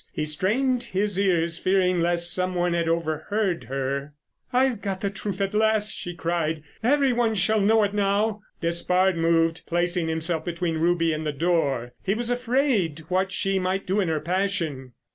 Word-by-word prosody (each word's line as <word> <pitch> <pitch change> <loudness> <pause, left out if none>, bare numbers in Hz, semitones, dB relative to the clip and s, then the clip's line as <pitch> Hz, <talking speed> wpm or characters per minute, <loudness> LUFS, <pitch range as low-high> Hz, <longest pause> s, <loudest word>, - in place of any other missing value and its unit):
He 155 - -2
strained 235 - +1
his 205 -4 -1
ears 170 -4 +1
fearing 185 -1 +2
lest 175 0 +2
some 185 0 0
one 175 0 +1
had 170 -1 0
overheard 170 +4 -1
her. 135 +2 -3 0.4
"I've 255 -3 +2
got 195 -3 -3
the 200 - -1
truth 200 -1 -5
at 195 0 -1
last," 215 0 +2
she 175 0 -6
cried. 165 -2 -2 0.2
"Every 270 +2 +3
one 235 -2 +1
shall 215 +2 +2
know 220 +2 +4
it 205 0 0
now." 205 +1 +1 0.2
Despard 180 +2 +1
moved, 165 0 +2
placing 175 0 0
himself 160 0 -1
between 170 -1 -2
Ruby 165 -1 +2
and 155 +1 -3
the 150 - -1
door. 145 -6 0
He 195 +2 0
was 240 +1 -2
afraid 245 - +1
what 190 +1 +1
she 195 0 0
might 185 +1 -1
do 195 +3 0
in 190 - +1
her 160 -1 0
passion. 165 -7 -2
180 Hz, 175 wpm, -25 LUFS, 165-205 Hz, 0.4 s, know